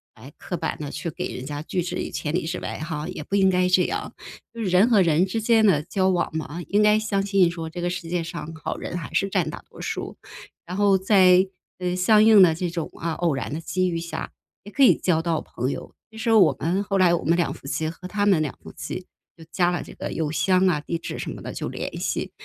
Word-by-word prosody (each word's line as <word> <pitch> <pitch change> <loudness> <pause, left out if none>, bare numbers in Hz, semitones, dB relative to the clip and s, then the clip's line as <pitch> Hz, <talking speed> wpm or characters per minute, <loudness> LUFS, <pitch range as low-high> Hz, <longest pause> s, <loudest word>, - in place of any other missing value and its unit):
诶， 130 +6 -13
刻 180 - -5
板 - - -3
地 150 -2 -5
去 170 - -4
给 155 - -5
人 125 - -6
家 145 +1 -5
拒 180 +3 -2
之 175 - -4
于 - - -4
千 150 - -3
里 175 - 0
之 175 +2 -3
外 - - -5
哈， 155 -1 -4
也 - - -6
不 195 - -3
应 190 -1 +4
该 180 -1 +2
这 180 0 +4
样。 - - -4 0.4
就 230 - -6
是 215 - -1
人 185 +5 +4
和 215 -5 +5
人 170 0 +3
之 210 +4 -3
间 225 0 +4
的 175 -8 +4
交 190 +3 0
往 175 -2 +1
嘛， 160 +2 -5
应 205 +1 +2
该 210 0 +5
相 200 -2 -1
信 195 -3 +3
说 165 -1 -6
这 175 +2 -6
个 175 - 0
世 180 -1 -5
界 175 0 0
上 165 -1 -7
好 - - -2
人 175 - -5
还 165 - -7
是 195 - +2
占 - - 0
大 - - -8
多 - - -12
数。 - - -5 0.5
然 180 - -6
后 200 -1 +4
在， 185 -1 +5 0.3
呃， 180 0 -1
相 210 +4 +5
应 220 -2 +7
的 175 -3 +7
这 175 +1 -2
种 170 -1 -4
啊， 165 0 -2
偶 170 -1 0
然 135 +1 -4
的 155 - -3
机 185 +3 -1
遇 170 - -2
下， 170 0 -5 0.3
也 205 - -11
可 275 - +3
以 260 - +7
交 165 -3 +1
到 165 -1 -1
朋 125 +3 -3
友。 - - -7 0.2
其 220 - -13
实 225 +1 0
我 185 -11 +5
们 175 +6 0
后 200 -1 -1
来 180 -2 +4
我 170 - 0
们 165 +3 +3
两 175 -2 0
夫 - - -12
妻 155 +3 -1
和 170 +3 -9
他 205 +1 -1
们 190 -6 +4
两 150 -4 -3
夫 - - -11
妻 - - -6 0.3
就 165 - -14
加 175 -1 +2
了 175 - -2
这 - - -12
个 - - -6
邮 155 -2 -2
箱 185 +3 +3
啊， 170 -5 +2
地 165 +3 -3
址 165 - -6
什 - - -4
么 - - -8
的 - - -6
就 - - -4
联 - - -5
系 - - -2
180 Hz, 285 characters per minute, -24 LUFS, 165-195 Hz, 0.5 s, 应